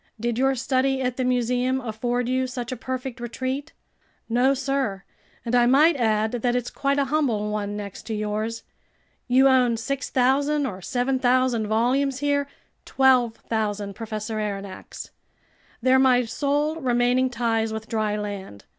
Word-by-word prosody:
"Did 235 +1 -1
your 270 +1 +3
study 265 +1 +1
at 250 -1 -2
the 260 - 0
museum 250 +1 +1
afford 240 +1 -2
you 260 +1 0
such 250 -1 -5
a - - -2
perfect 255 0 -5
retreat?" 260 +5 -4 0.6
"No, 250 +4 +3
sir, 265 -7 -2 0.4
and 235 - -3
I 240 -1 +5
might 300 +6 +5
add 220 -3 +1
that 245 0 0
it's 245 -1 -2
quite 280 0 0
a 280 - +2
humble 225 -9 +1
one 205 -1 -3
next 200 -2 -8
to 220 - -2
yours. 215 +2 -3 0.6
You 260 +2 +5
own 250 -3 +3
6,000 275 +3 +1
or 190 -7 -5
7,000 250 -1 +1
volumes 255 +5 +1
here.. 285 0 0 0.2
." - - -46
"12,000, 225 -5 +1
Professor 220 0 -5
Aronnax. 200 -2 -6 0.7
They're 260 +1 +5
my 250 -2 +4
sole 290 +6 -1
remaining 250 -2 +2
ties 225 -2 0
with 220 0 -5
dry 215 -2 -1
land. 200 - -6
245 Hz, 145 wpm, -24 LUFS, 220-265 Hz, 0.7 s, I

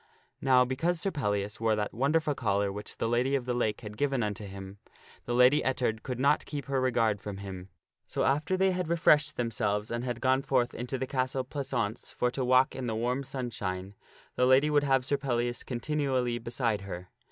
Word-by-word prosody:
Now 130 -2 +5
because 165 +7 0
Sir 195 - 0
Pellias 105 - -2
wore 110 -1 +2
that 105 -1 -2
wonderful 150 +5 +1
collar 100 -5 0
which 105 +1 -7
the - - -1
Lady 125 +4 +1
of 130 -3 -1
the 125 - -1
Lake 115 -3 -1
had 105 -1 -8
given 135 -4 +1
unto 105 0 -3
him, 95 0 -9 0.5
the 120 - -1
Lady 125 +4 +6
Ettard 120 -4 0
could 125 -2 -5
not 140 +3 +2
keep 145 -2 -5
her 135 -1 0
regard 115 -5 +1
from 100 -2 -6
him. 95 -1 -8 0.4
So - - -1
after 150 +7 +1
they 190 0 +3
had 180 -2 -2
refreshed 155 -3 +3
themselves 105 -2 -1
and 120 +1 -2
had 120 -2 -3
gone 130 0 +2
forth 125 -3 +1
into 125 +2 -3
the 130 - -2
castle 130 0 -1
pleasaunce 125 -5 -3
for 125 - 0
to 130 - -2
walk 130 +1 +4
in 130 -2 -4
the 110 - -1
warm 125 +4 -1
sunshine, 105 -8 -4 0.4
the 125 - +3
lady 135 +4 +5
would 145 -1 +3
have 135 -2 +2
Sir 140 +1 +1
Pellias 120 -3 -1
continually 130 -2 -1
beside 115 -2 -1
her. 90 -2 -7
125 Hz, 200 wpm, -29 LUFS, 110-135 Hz, 0.5 s, Lady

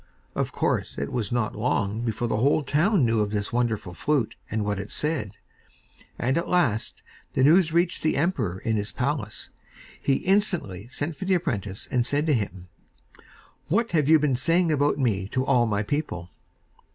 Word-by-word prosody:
Of - - -2
course, - - -1
it 70 0 -3
was 115 -3 -2
not 120 -3 -1
long 105 -1 -1
before 120 0 -2
the 110 -2 0
whole 140 +6 +2
town 155 - +2
knew 115 -1 +2
of 105 -1 +1
this 105 0 -2
wonderful 110 -6 -1
flute 130 - 0
and 110 -1 -1
what 105 -1 -1
it 100 - -6
said; 150 -10 0 0.8
and, 130 +6 +1
at 170 - -4
last, 125 -12 0 0.3
the 130 - +2
news 165 +3 +5
reached 170 +1 +1
the 155 - +1
emperor 120 - 0
in 110 +3 -1
his 105 0 0
palace. 130 -5 -3 0.5
He 135 - +2
instantly 175 - +1
sent 145 +5 -3
for 190 - -5
the 190 0 +3
apprentice 105 - -2
and 125 -2 +2
said 145 +4 +1
to 155 - +2
him: 95 -6 -3 1.0
'What 225 +9 +1
have 155 -4 +2
you 160 - +8
been 150 -3 +1
saying 165 +6 +2
about 145 -1 +2
me 105 -8 0
to 130 +5 -1
all 125 -4 +3
my 105 -1 0
people? 105 - -3
125 Hz, 180 wpm, -25 LUFS, 105-155 Hz, 1.0 s, you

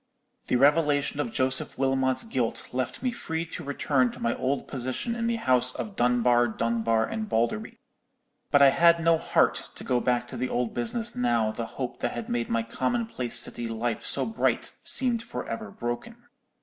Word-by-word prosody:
The - - +1
revelation 145 +2 +3
of 235 - -1
Joseph 130 -7 +1
Wilmot's 130 -1 +2
guilt 130 - -2
left 130 - -3
me 250 - +1
free 165 -7 -4
to 165 0 -7
return 140 -3 +1
to - - -11
my 115 - 0
old 135 +2 -2
position 130 - -3
in 230 -1 -2
the 235 - +1
house 125 - +2
of 210 -3 -5
Dunbar, 120 0 +3
Dunbar, 115 0 0
and 220 -1 -4
Balderby. 115 - -1 0.7
But 145 -1 +5
I 140 - +9
had 170 +3 +5
no 165 0 +3
heart 170 - +1
to - - -7
go 125 - +1
back 120 0 0
to - - -7
the 130 - -2
old 120 -1 -1
business 225 - -1
now 120 -3 +1
the 115 +1 -5
hope 125 -2 -4
that 120 - -2
had 120 -2 -6
made 120 0 -1
my 115 0 0
commonplace 175 - -2
city 120 - -1
life 115 0 -3
so - - +1
bright 225 0 0
seemed 245 -3 +3
for 235 - -6
ever 110 -2 -5
broken. 120 - -5
130 Hz, 185 wpm, -27 LUFS, 120-165 Hz, 0.7 s, I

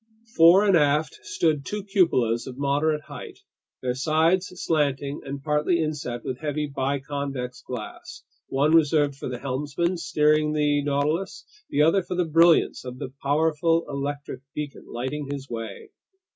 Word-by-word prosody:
Fore 170 +4 +7
and 195 -3 +4
aft 150 - +2
stood 165 - 0
two 210 +7 -4
cupolas 165 - +2
of 130 -1 -8
moderate 145 +2 +1
height, - - -9 0.5
their 125 -1 0
sides 160 +7 +1
slanting 145 -4 -1
and 140 0 -6
partly 150 +3 +1
inset 150 -6 -3
with 125 - -4
heavy 150 -1 -2
biconvex 140 -2 -3
glass, 120 -4 -8 0.2
one 145 +4 +2
reserved 150 -3 +3
for 135 - -6
the 125 - -4
helmsman 145 +7 -2
steering 150 -1 +2
the 145 -1 +2
Nautilus, 145 +6 -1 0.2
the 150 - +3
other 165 +5 +4
for 180 0 -5
the 180 -1 +1
brilliance 165 +1 +4
of 125 -1 -7
the 130 0 -7
powerful 160 +3 +2
electric 140 -1 -4
beacon 150 -2 -6
lighting 135 +4 -4
his 140 -1 -5
way. 115 -4 -6
150 Hz, 145 wpm, -25 LUFS, 140-160 Hz, 0.5 s, Fore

